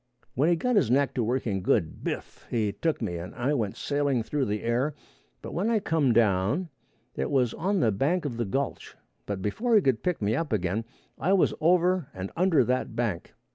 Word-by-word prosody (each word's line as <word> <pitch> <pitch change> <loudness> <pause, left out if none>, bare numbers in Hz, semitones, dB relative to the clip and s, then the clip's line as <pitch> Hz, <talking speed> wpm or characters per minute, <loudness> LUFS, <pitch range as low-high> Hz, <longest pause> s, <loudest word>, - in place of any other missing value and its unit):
When 145 +6 +2
he 175 - +4
got 245 +7 +1
his 140 - +3
neck 140 +2 +2
to 125 - 0
working 110 -4 -1
good, 90 -3 0
biff! - - -5
he 110 -3 0
took 160 +3 -2
me 85 -5 -2
and 90 +3 -8
I 130 +5 0
went 110 -8 -1
sailing 140 -4 0
through 140 +3 -1
the 105 -1 -2
air, 125 +6 0 0.5
but - - -7
when 195 +6 0
I 225 -2 +3
come 160 -8 +1
down 115 - +2 0.5
it - - -2
was 130 -5 +2
on 190 +2 0
the 110 - +3
bank 150 - 0
of 125 -5 -3
the 120 - -1
gulch, 135 +8 -3 0.3
and 100 -2 -3
before 225 - +1
he 210 - +6
could 130 -4 +2
pick 180 -2 -1
me 105 +1 0
up 160 +2 -2
again 100 +2 -1 0.3
I 185 - +2
was 195 - +3
over 180 -1 +3
and 95 +1 -5
under 175 -5 +4
that 125 +2 -1
bank. 110 -8 -2
130 Hz, 210 wpm, -27 LUFS, 110-165 Hz, 0.5 s, he